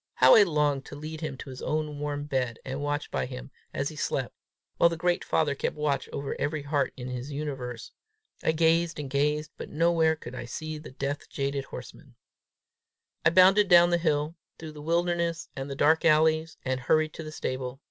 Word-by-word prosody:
How 130 0 +7
I 220 - +9
longed 150 -6 +2
to - - -9
lead 155 +2 -7
him 155 -4 -4
to 135 - -8
his 130 - -9
own 150 -1 -2
warm 145 0 -3
bed, 130 -5 -1
and 135 +2 -4
watch 145 +1 -2
by - - -1
him 130 +1 -8 0.2
as 140 +1 -2
he 155 - -10
slept, 135 -4 -2 0.4
while 170 - +6
the 165 - -4
great 175 +1 +1
father 155 -3 +1
kept 140 - -2
watch 150 -2 -1
over 140 0 -4
every 150 0 -1
heart 140 -1 0
in 125 0 -6
his 125 +3 -5
universe. 135 -5 -5 0.5
I - - +2
gazed 165 0 +2
and 140 -3 -5
gazed, 150 +2 0
but - - -7
nowhere 165 0 +3
could 125 -5 -10
I 125 - -6
see 155 +5 -5
the 155 - -10
death 140 +2 -4
jaded 140 0 -2
horseman. - - -11 1.1
I 160 - +6
bounded 190 +4 +6
down 175 -1 +7
the 175 - +3
hill, 155 -1 0 0.2
through 160 -1 -8
the 150 -1 -10
wilderness 170 +1 0
and 135 +1 -5
the 140 - -4
dark 155 +3 +3
alleys, 160 0 +3
and 130 0 0
hurried 155 +4 +2
to 160 - -7
the 155 - -7
stable. 130 -3 -4
150 Hz, 200 wpm, -28 LUFS, 140-160 Hz, 1.1 s, I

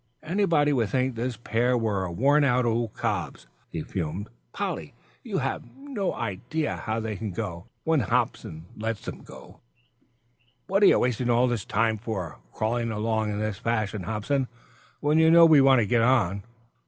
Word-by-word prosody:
"Anybody 160 -4 +2
would 115 -6 +1
think 130 0 0
this 120 0 -3
pair 120 +2 +1
were 100 -5 -1
worn 140 - +3
out 125 -2 +2
old 115 -1 -1
cobs," - - -3 0.2
he 80 - -4
fumed. 90 +2 -4 0.2
"Polly, - - -4 0.3
you - - -4
have - - -2
no 270 -9 -3
idea 120 +8 -3
how 110 +1 -3
they 110 -1 -3
can 105 +2 -4
go, 90 -1 -5 0.2
when 160 -1 +2
Hobson 85 -6 -1
lets 110 0 -4
them - - -7
out. - - -13 1.1
What 195 +2 +1
are 200 - +8
you - - +6
wasting 125 0 0
all 120 +1 +4
this 120 -5 -1
time 110 0 +1
for, 100 -7 -5
crawling 115 +2 -1
along 110 0 -1
in 105 - -3
this 110 -2 -3
fashion, 110 -3 -1
Hobson, 110 +8 -1 0.5
when 150 +2 +3
you 160 0 +6
know 170 0 +8
we 155 -4 +7
want 135 -2 +6
to - - +1
get 115 +3 +2
on?" 110 -6 +2
115 Hz, 170 wpm, -26 LUFS, 105-135 Hz, 1.1 s, are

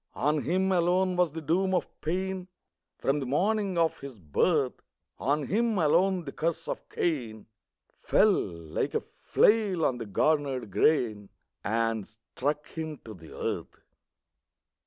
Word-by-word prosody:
On 150 0 +1
him 190 +4 +1
alone 180 +1 +2
was 180 -3 +2
the 160 0 -6
doom 185 +5 +1
of 175 - 0
pain, 185 +3 -2 0.5
From 140 +2 0
the 135 - -4
morning 195 - +1
of 165 -1 +2
his 135 -4 -9
birth; 130 - +1 0.4
On 145 +1 0
him 225 - +1
alone 180 +3 +3
the 140 - -5
curse 165 +2 -2
of - - -5
Cain 120 -10 -2 0.5
Fell, - - +4
like 85 -2 -3
a - - +2
flail 205 -7 +2
on 125 -2 0
the 115 - -5
garnered 135 0 0
grain, 110 -7 +2 0.3
And 115 -1 0
struck 130 +7 -4
him 160 -2 -5
to 110 - -8
the 85 -5 -13
earth! - - -4
155 Hz, 140 wpm, -28 LUFS, 125-180 Hz, 0.5 s, Fell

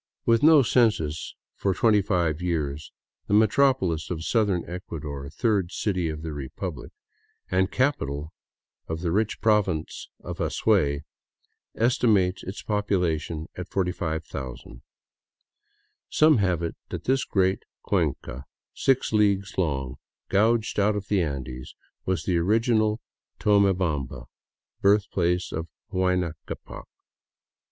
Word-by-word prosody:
With 115 -1 +4
no 155 -2 +7
census 105 - +1 0.2
for 95 -2 -1
twenty 105 0 +4
five 90 -5 0
years, 75 -4 -2 0.4
the 100 - +2
metropolis 105 - +3
of 80 -2 -3
southern 105 -7 +1
Ecuador, 75 -6 -6
third 95 - 0
city 90 -6 -1
of 75 0 -6
the 80 -1 -4
republic, 70 -3 -6 0.6
and 95 +1 +2
capital 75 - -1 0.5
of 80 0 -4
the 85 -2 -1
rich 105 +4 0
province 100 -8 0
of - - -7
Azuay, 70 0 +1 0.7
esti 120 +1 +2
mates 95 -3 +3
its 95 +3 -7
population 90 -6 -1
at 90 -1 -7
45,000. 80 -9 -4 1.3
Some 155 -2 +5
have 90 -4 +1
it 85 - -3
that - - -5
this 130 +1 +1
great 95 -1 +1 0.2
cuenca, 65 +1 -1 0.3
six 135 -4 +1
leagues 100 -1 +2
long, 65 -7 -1 0.3
gouged 110 +2 +2
out 105 +1 +3
of 105 0 -5
the 100 -3 +2
Andes, 65 -5 -5 0.3
was 95 0 0
the 90 -3 +1
original 110 +3 +2 0.4
Tonie 100 -1 +4
bamba, 75 -9 -2 0.6
birthplace 95 -3 +2
of 80 +1 -4 0.3
Huayna 90 -3 +1
Ccapac. - - -8
90 Hz, 120 wpm, -26 LUFS, 80-105 Hz, 1.3 s, no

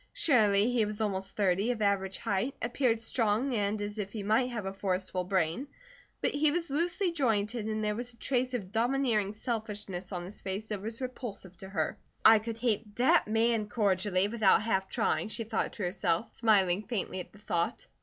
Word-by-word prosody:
Surely 225 - +3
he 240 -3 +2
was 210 0 -3
almost 195 -3 -2
thirty, 200 +2 +2
of 245 -2 -1
average 195 -2 +1
height, 225 +5 -1
appeared 240 -1 +1
strong, 225 +2 +1
and 205 -1 0
as 205 +1 -5
if 200 -1 -3
he 215 -3 -4
might 225 +5 +2
have 225 -5 -4
a 195 - -3
forceful 185 -1 -2
brain; 180 - 0 0.5
but - - +1
he 295 +1 +3
was 330 0 -2
loosely 345 +5 0
jointed 225 -6 0
and 215 0 -2
there 210 0 +1
was 240 +3 -5
a 235 - -17
trace 255 0 0
of 195 -6 -5
domineering 230 -3 +1
selfishness 210 -5 -5
on 175 -2 -4
his 195 +4 -9
face 195 +3 -4
that 210 -3 -4
was 225 +4 -5
repulsive 240 -7 -6
to 190 +2 -10
her. 195 - -2 0.3
"I 220 0 +9
could 225 +1 -5
hate 220 -3 -1
that 300 +5 +4
MAN 225 -1 +1
cordially, 195 -2 +2
without 215 -2 +3
half 190 -4 0
trying," - - 0
she 220 +1 -3
thought 225 0 -2
to 210 - -5
herself, 180 +2 -1
smiling 200 -5 +3
faintly 215 -4 -3
at 180 - -8
the - - -17
thought. 175 0 -2
215 Hz, 195 wpm, -30 LUFS, 195-235 Hz, 0.5 s, I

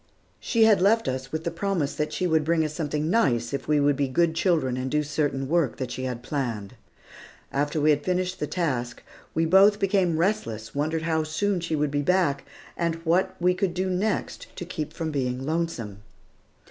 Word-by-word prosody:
She 230 -3 +2
had 215 -4 +5
left 225 +4 +3
us 130 +1 -3
with 160 0 -3
the 170 - -2
promise 165 -4 -1
that 150 - -2
she 185 - -2
would 160 -3 +2
bring 160 0 +2
us 155 - -4
something 150 -1 -2
nice 120 - +2
if 140 -1 -3
we 150 -1 +3
would 145 0 +3
be 140 0 0
good 160 +5 +2
children 160 -7 +1
and 130 +1 -3
do 150 +2 +1
certain 145 -2 -1
work 165 -3 +1
that 130 -3 -4
she 130 +1 -4
had 125 -2 -4
planned. 120 -8 -3 0.8
After 145 +2 0
we 150 +1 +4
had 145 0 +1
finished 185 +1 -1
the 150 - -2
task, 130 -7 -2 0.3
we 165 - +2
both 195 +5 +6
became 190 -5 +1
restless, 160 - -1
wondered 155 +3 -1
how 160 -1 +1
soon 185 +5 -1
she 170 -2 -2
would 150 -1 0
come 145 - +1
back, 175 -4 +1 0.3
and 170 -1 0
what 185 +3 +2
we 180 +1 +3
could 185 -1 -1
do 185 +1 -1
next 195 +3 -2
to 175 - -6
keep 155 -3 -5
from 160 0 -4
being 130 -2 -2
lonesome. 145 -11 -3
155 Hz, 200 wpm, -25 LUFS, 140-180 Hz, 0.8 s, both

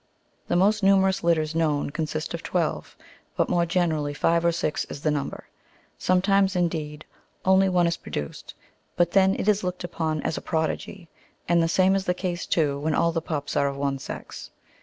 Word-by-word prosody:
The - - 0
most 205 +4 +3
numerous 190 -1 +3
litters 160 -2 +1
known 150 -3 0
consist 155 0 -3
of 170 - -4
twelve, 170 -4 -2 0.4
but - - +1
more 170 -1 +2
generally 160 -4 0
five 165 +3 +2
or 170 - +3
six 160 -2 -1
is 140 - -8
the 155 - +2
number; 145 -2 -4 0.5
sometimes, 195 +1 +2
indeed, 155 -4 -2 0.4
only 190 0 +4
one 180 -1 +3
is 170 0 0
pro - - -12
duoed, 75 -1 -6 0.4
but 175 -1 +2
then 195 0 +4
it - - -3
is 210 -1 +3
looked 180 0 -3
upon 160 -3 -2
as - - -2
a - - -14
prodigy, 165 +2 -3 0.4
and 170 0 +3
the 165 - +2
same 185 +3 +3
is 195 -1 0
the 180 - 0
case, 180 -1 -3
too, 145 -4 +1
when 155 +1 -1
all 170 - +2
the 165 0 -2
pups 150 -4 -4
are 140 - +2
of 140 0 -4
one 140 -1 -1
sex. - - -8
170 Hz, 195 wpm, -25 LUFS, 155-185 Hz, 0.5 s, only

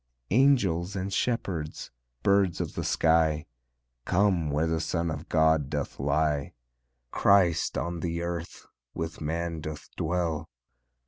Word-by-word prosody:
Angels 100 -8 +3
and 95 +1 -3
shepherds, 90 -10 -2 0.3
birds 100 -3 +3
of - - -3
the - - -3
sky, 80 -2 +2 0.6
Come 90 -1 +2
where 75 +3 +1
the 80 0 0
Son 85 +1 -1
of - - -6
God 80 -3 +3
doth 75 -1 -4
lie; 75 +1 0 0.6
Christ 90 -4 +3
on 85 +2 -2
the 85 0 -2
earth 85 -1 -5 0.3
with 80 0 -4
man 85 +1 -2
doth 75 0 -7
dwell. 80 -2 -1
85 Hz, 125 wpm, -28 LUFS, 80-90 Hz, 0.6 s, Angels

